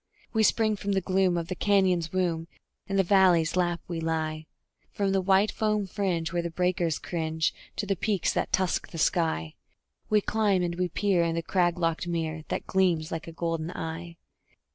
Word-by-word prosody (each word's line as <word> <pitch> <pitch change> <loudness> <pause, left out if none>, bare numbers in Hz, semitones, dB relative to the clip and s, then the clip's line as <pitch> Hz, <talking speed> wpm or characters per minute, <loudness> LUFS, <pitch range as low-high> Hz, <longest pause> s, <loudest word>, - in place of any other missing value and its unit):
We 220 - +2
spring 215 -1 +3
from 200 0 -2
the 195 - +2
gloom 185 -1 +2
of 165 -1 -3
the 185 - -3
canyon's 185 -4 +2
womb; 170 -3 -1 0.4
in 195 - -2
the 195 - +4
valley's 180 -4 +4
lap 175 -2 +1
we 170 -2 -3
lie; 155 -1 -2 0.4
From 200 -1 0
the 195 0 +2
white 195 +2 +3
foam 210 -2 0
fringe, 180 -4 -2
where 175 - +1
the 170 - -3
breakers 175 -1 0
cringe 160 -2 -1 0.2
to 210 - -2
the 195 0 0
peaks 200 0 0
that - - -1
tusk 185 -1 0
the 165 - -8
sky, 155 - 0 0.6
We 215 - +4
climb, 205 -4 +1
and 170 -1 -1
we 180 +1 -1
peer 190 +1 +1
in 165 -1 0
the 165 - -2
crag 175 -1 +1
locked 165 0 -1
mere 160 -2 -3
that - - -3
gleams 175 -5 +1
like 165 0 -4
a - - -6
golden 165 -1 -3
eye. 170 0 -6
175 Hz, 190 wpm, -27 LUFS, 165-195 Hz, 0.6 s, the